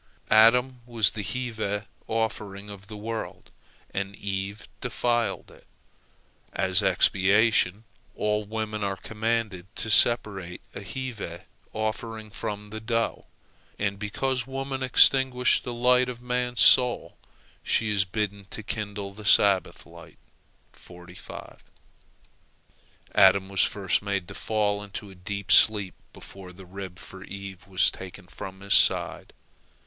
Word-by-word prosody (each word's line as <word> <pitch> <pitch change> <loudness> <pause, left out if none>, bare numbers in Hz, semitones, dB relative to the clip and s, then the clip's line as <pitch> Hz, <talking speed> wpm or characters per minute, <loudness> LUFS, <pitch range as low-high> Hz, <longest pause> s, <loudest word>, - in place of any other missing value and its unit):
Adam 125 +4 +5
was 115 -4 +2
the 110 - -5
heave 120 0 -4 0.5
offering 105 -2 -3
of 100 0 -11
the 105 -1 -8
world, 110 +1 -6 0.4
and 100 +1 -3
Eve 100 +1 -5
defiled 120 -4 -1
it. - - -19 0.8
As 95 0 +1
expiation, 100 +2 +3 0.3
all 105 0 0
women 110 0 -4
are 100 -1 -1
commanded 110 -3 -2
to 110 - -2
separate 100 -7 +3
a - - -7
heave 105 -5 -6 0.3
offering 110 0 -4
from 105 0 -5
the 110 - -5
dough. 115 +1 -2 0.5
And 100 -1 -2
because 125 +4 -2
woman 135 0 -4
extinguished 130 -1 +4
the 125 - -3
light 125 +1 +3
of 120 -1 -6
man's 125 0 -1
soul, 125 -2 +5 0.5
she 110 -2 +1
is 100 -2 +2
bidden 100 +1 -3
to 110 - -7
kindle 105 -2 -5
the 105 +2 -11
Sabbath 100 -2 +3
light. - - -14 3.0
Adam 95 -1 +5
was 100 -1 +1
first 100 -3 +1
made 100 -3 -2
to - - -8
fall 105 0 -1
into 100 0 -8
a - - -12
deep 100 +2 -5
sleep 105 -4 +5 0.2
before 95 -2 -11
the 95 +1 -13
rib 95 0 -8
for 95 -1 -11
Eve 95 -2 -9
was 95 -1 +3
taken 95 0 -10
from 95 +1 -9
his 100 0 0
side. - - +2
105 Hz, 125 wpm, -26 LUFS, 100-115 Hz, 3.0 s, Adam